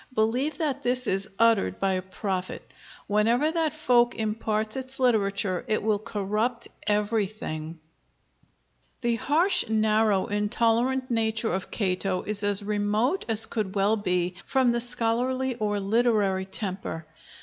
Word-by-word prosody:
Believe 250 +7 0
that 300 -5 -1
this 250 +1 0
is 195 -1 -1
uttered 225 - +3
by 195 -1 0
a 185 - -1
prophet: 185 0 -5 0.3
whenever 230 +9 +2
that 325 -2 0
folk 245 -6 +2
imparts 215 0 -1
its 265 0 -4
literature, 200 -6 +1
it 215 - 0
will 215 -1 +1
corrupt 215 +3 -2 0.2
everything." 205 -7 -2 1.2
The 235 -2 0
harsh, 315 - +2
narrow, 215 -2 +2
intolerant 230 +5 0
nature 225 0 0
of 190 - -3
Cato 185 -2 -1
is 210 0 0
as 205 0 +2
remote 210 - 0
as 225 -1 +7
could 210 -3 -4
well 200 +2 +3
be 180 -3 -1
from 260 -3 +2
the 235 0 0
scholarly 245 +2 0
or 210 -3 -2
literary 200 -2 +1
temper. 190 -4 -4
215 Hz, 130 wpm, -26 LUFS, 200-240 Hz, 1.2 s, as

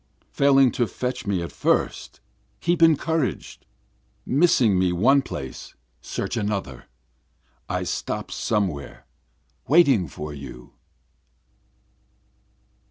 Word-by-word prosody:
Failing 135 -2 +4
to 120 - 0
fetch 125 -2 -4
me 95 -4 0
at 85 - -6
first - - -1 0.4
keep 170 0 0
encouraged, 160 -2 +1 0.6
Missing 125 - +3
me 90 -1 +2
one 125 +11 +4
place 65 - -8 0.3
search - - -4
another, 100 - -3 0.8
I - - -1
stop - - -4
somewhere 90 -13 -2 0.6
waiting 140 - +4
for 75 +1 -7
you. 70 -3 -11
110 Hz, 95 wpm, -24 LUFS, 85-140 Hz, 0.8 s, Failing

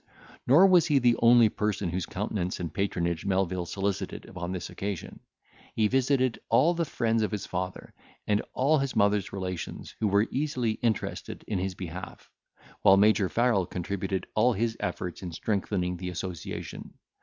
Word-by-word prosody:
Nor 155 +9 +7
was 180 -4 +5
he 150 -3 +3
the 120 -2 +4
only 120 -1 +7
person 105 -4 -1
whose 90 0 -2
countenance 95 -2 -3
and 85 -3 -4
patronage 85 -4 -1
Melvil 95 -2 0
solicited 100 +1 -3
upon 90 -1 -6
this 90 -1 -4
occasion; 95 0 -5 0.6
he 110 -1 +3
visited 130 0 +1
all 135 +9 +4
the 170 -1 -1
friends 115 -5 0
of 110 - +1
his 105 -2 -4
father, 90 0 -5 0.3
and 105 0 +2
all 145 +4 +3
his 135 -1 -2
mother's 100 -1 +2
relations, 90 -3 -5
who 110 - +1
were 100 +2 +3
easily 130 -5 0
interested 110 0 -3
in 100 -4 -1
his 95 0 -3
behalf; 90 +1 -8 0.5
while 95 - +7
Major 105 -1 +4
Farrel 115 -7 +2
contributed 95 +1 -3
all 120 +3 +3
his 115 +2 -1
efforts 90 0 -4
in 90 -2 -5
strengthening 90 0 -1
the 90 +1 -5
association. 90 -1 -6
100 Hz, 160 wpm, -28 LUFS, 90-115 Hz, 0.6 s, Nor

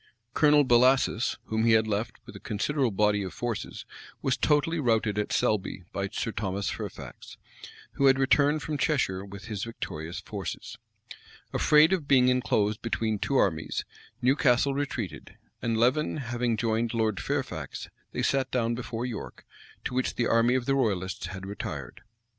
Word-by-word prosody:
Colonel 150 -1 +5
Bellasis, 125 -2 +3
whom 110 0 -1
he 115 0 +5
had 110 0 +4
left 110 +2 -2
with - - -12
a - - -8
considerable 130 +5 0
body 105 0 +2
of 95 - -6
troops, 120 -3 -4 0.4
was 130 - +2
totally 155 +3 +2
routed 110 -5 +1
at 105 - -2
Selby 95 -3 0
by 100 0 -1
Sir 115 - -3
Thomas 100 -1 -2
Fairfax, - - -8 0.5
who 140 - +2
had 135 -1 +5
returned 145 +2 +3
from 150 0 -3
Cheshire 125 -11 +1
with 100 0 -10
his 105 -4 -4
victorious 85 -8 -5
forces.[] - - -6 0.7
Afraid 155 +4 +5
of 165 -7 -1
being 125 -2 +5
enclosed 110 -4 +1
between 110 -2 -1
two 140 - -1
armies, 80 -9 0 0.4
Newcastle 135 0 +3
retreated; 135 - -4 0.2
and 115 -1 0
Leven 130 +8 +2
having 120 -3 -1
joined 115 +1 0
Lord 110 -3 0
Fairfax, - - -4 0.2
they - - -3
sat 135 -1 +1
down 120 -2 0
before 120 0 -4
York, 120 -4 -7 0.4
to - - -3
which 130 0 -1
the 120 - +1
army 115 +2 +3
of 130 -2 0
the 135 - +2
royalists 95 -9 -1
had 95 +1 -7
retired. 75 -10 -6
115 Hz, 160 wpm, -28 LUFS, 105-135 Hz, 0.7 s, Colonel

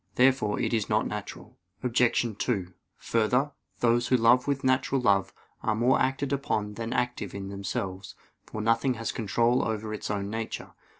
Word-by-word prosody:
Therefore 125 -5 +3
it - - 0
is 110 -3 0
not - - +2
natural. - - -7 0.2
Obj. 120 -2 +2
2: 95 -7 -1 0.2
Further, 125 +6 +1 0.3
those 120 0 +3
who 130 - +4
love 120 +3 +4
with 140 -1 0
natural 130 +1 +2
love 100 -6 +2 0.3
are 110 - 0
more 120 +4 +3
acted 135 +1 0
upon 105 -6 -1
than 115 +2 -5
active 125 -6 -2
in 95 -1 -5
themselves; 95 -2 -4 0.3
for 110 - -5
nothing 115 +4 +2
has 115 0 -3
control 115 +3 +1
over 110 -1 -3
its 105 - -5
own 100 -1 -2
nature. 115 0 -4
115 Hz, 165 wpm, -28 LUFS, 105-125 Hz, 0.3 s, who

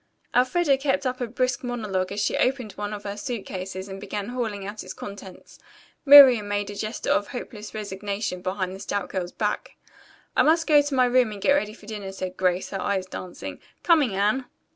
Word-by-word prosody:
Elfreda 270 +3 +3
kept 275 0 0
up 255 0 -2
a 245 - -1
brisk 255 +3 -1
monologue 210 -7 -2
as 200 - -3
she 205 - 0
opened 255 -4 0
one 205 +1 -5
of 210 -1 -6
her 200 0 -4
suit 230 0 -5
cases 190 0 -6
and 195 0 -8
began 205 +1 -4
hauling 220 -5 -3
out 205 +1 -6
its - - -7
contents. 200 -2 -10 0.5
Miriam 265 -7 +9
made 205 0 -2
a - - -8
gesture 215 +3 -3
of 205 - +2
hopeless 215 -5 -8
resignation 200 -2 -4
behind 185 0 -2
the - - -10
stout 200 -2 -3
girl's 180 -2 -3
back. 210 -1 -3 0.6
"I - - +5
must 325 +2 +4
go 295 -2 +6
to 290 -1 -3
my 255 -1 +5
room 245 -2 +3
and 205 - -7
get 280 - +3
ready 215 -7 0
for 210 - -16
dinner," 205 -3 -6
said 185 -1 -5
Grace, 185 -1 0
her 195 - -3
eyes 190 -2 -1
dancing. 185 -1 -8 0.2
"Coming, 295 - +3
Anne?" 210 +7 +1
210 Hz, 205 wpm, -25 LUFS, 195-250 Hz, 0.6 s, Miriam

